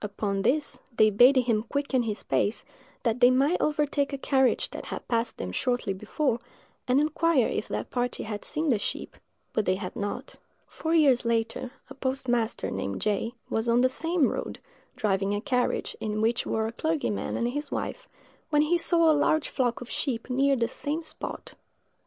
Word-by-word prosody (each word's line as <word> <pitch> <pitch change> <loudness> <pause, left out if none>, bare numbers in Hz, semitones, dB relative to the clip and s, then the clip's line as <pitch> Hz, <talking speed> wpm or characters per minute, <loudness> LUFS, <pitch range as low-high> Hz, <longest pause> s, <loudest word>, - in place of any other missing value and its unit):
Upon 200 -1 -2
this, 290 +8 0 0.2
they 215 0 +6
bade 245 +7 +7
him 235 -4 +2
quicken 270 +2 -1
his 215 -3 -3
pace, 210 - 0 0.4
that 230 0 +1
they 245 - +7
might 275 +7 +2
overtake 295 -1 +1
a 275 - -3
carriage 265 -1 +2
that - - -7
had - - -6
passed 230 0 0
them 90 - -4
shortly 245 - 0
before, 225 +6 -1 0.5
and 255 +2 +4
inquire 310 -3 +2
if - - -3
that - - -4
party 245 0 -1
had 210 -1 -5
seen 310 +1 -2
the 225 - +2
sheep; - - -4 0.4
but 215 - +1
they 185 - +2
had 185 -2 -6
not. 205 0 -4 0.3
Four 325 +1 -2
years 275 -6 +5
later, 230 +1 -1 0.2
a - - -10
postmaster, 260 -4 -1
named 95 0 -3
J——, 215 +3 -1
was 225 +1 -1
on 235 +1 +4
the 255 - +4
same 325 +2 +1
road, - - -4 0.4
driving 200 -4 0
a - - -1
carriage, 250 +3 0
in 215 -1 -2
which 230 +2 +1
were 220 0 0
a 225 - -2
clergyman 300 -4 -1
and 235 - 0
his 290 +2 -3
wife, - - -4 0.4
when 295 -1 +4
he 340 +3 +2
saw 335 -1 +4
a - - +5
large 305 +1 +2
flock 245 -2 0
of 245 - -8
sheep 255 -3 -2
near 275 +2 +3
the 235 -2 +1
same 300 +6 -3
spot. 310 - -7
250 Hz, 185 wpm, -27 LUFS, 220-290 Hz, 0.5 s, bade